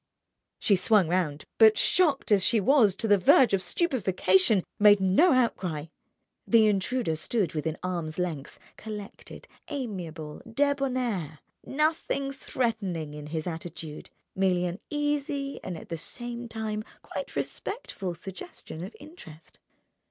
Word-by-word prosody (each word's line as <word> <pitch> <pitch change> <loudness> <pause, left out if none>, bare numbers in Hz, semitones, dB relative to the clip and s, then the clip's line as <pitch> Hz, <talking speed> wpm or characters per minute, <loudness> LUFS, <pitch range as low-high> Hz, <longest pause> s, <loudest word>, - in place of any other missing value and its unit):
She 200 - +3
swung 190 0 +3
round 165 -5 -1
but, 220 -1 +7
shocked 300 -10 +3
as 200 -3 +5
she 230 +2 +3
was 215 -3 +4
to 225 - -2
the 205 -2 +5
verge 230 +5 +5
of 195 - +2
stupefaction, 190 - +2 0.2
made 205 -1 +7
no 195 - +4
outcry. 185 - 0 0.6
The 230 -2 +6
intruder 210 -2 0
stood 185 +3 -1
within 160 0 -2
arm's 170 -4 -3
length, 165 -6 -4 0.2
collected, 210 -2 -9 0.2
amiable, 175 - -5
debonair, 255 - 0 0.3
nothing 300 -2 0
threatening 215 - -3
in 150 0 -8
his 155 0 -4
attitude, 165 -2 -7 0.3
merely 185 -2 +2
an 175 +3 -4
easy 290 -1 -2
and 180 -3 -5
at - - -12
the 165 - -3
same 240 +5 -5
time 220 -1 -3 0.2
quite - - -6
respectful 195 - -4
suggestion 175 -2 -8
of 195 - -8
interest. 165 - -14
200 Hz, 130 wpm, -27 LUFS, 175-250 Hz, 0.6 s, but